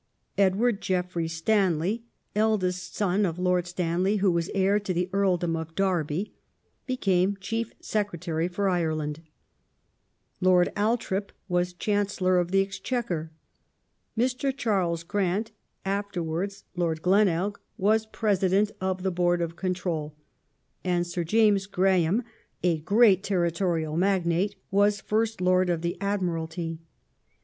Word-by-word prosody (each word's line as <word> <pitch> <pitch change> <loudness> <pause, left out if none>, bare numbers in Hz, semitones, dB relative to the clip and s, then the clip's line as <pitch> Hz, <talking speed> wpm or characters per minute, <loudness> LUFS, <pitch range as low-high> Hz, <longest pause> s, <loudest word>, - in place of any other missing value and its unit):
Edward 200 +3 +2
Geoffrey 180 -2 -1
Stanley 180 +3 +1 0.3
(eldest 190 -5 0
son 200 0 +1
of 170 -4 -1
Lord 180 -1 +1
Stanley, 180 +3 0
who 195 -2 +3
was 170 0 -1
heir 195 +2 +3
to 195 -3 -3
the 180 +1 0
Earldom 180 -4 +1
of 160 0 -6
Derby) 180 -1 0 0.5
became 195 -6 +1
Chief 225 +4 -3
Secretary 175 -6 -2
for 195 +3 -1
Ireland; 160 -4 -1 1.2
Lord 180 -1 +4
Al 215 +4 +2
thorp 200 -3 -3 0.2
was 180 -1 +1
Chancellor 195 -2 +1
of 175 -1 -1
the 195 +1 +3
Exchequer; 195 -4 -3 0.9
Mr. 255 +3 +1
Charles 180 -9 0
Grant 205 +4 -1 0.3
(afterwards 195 -1 -2
Lord 165 -3 -1
Glenelg) 195 0 +2 0.2
was 215 +3 +2
President 205 -1 +1
of 185 -1 -1
the 190 - +1
Board 175 0 +2
of 170 -1 -2
Control, 175 -5 -2 0.7
and 175 -1 +1
Sir 175 0 -3
James 205 +1 +3
Graham, 190 +2 +2 0.4
a 170 -3 +2
great 200 +3 +5
territorial 170 -4 0
magnate, 185 +1 +1 0.2
was 205 +1 +3
Fii 220 +3 +1
st 220 -4 -11
Lord 185 0 +3
of 170 -1 -1
the 170 - -1
Admiralty. 165 -4 -2
185 Hz, 125 wpm, -27 LUFS, 175-205 Hz, 1.2 s, great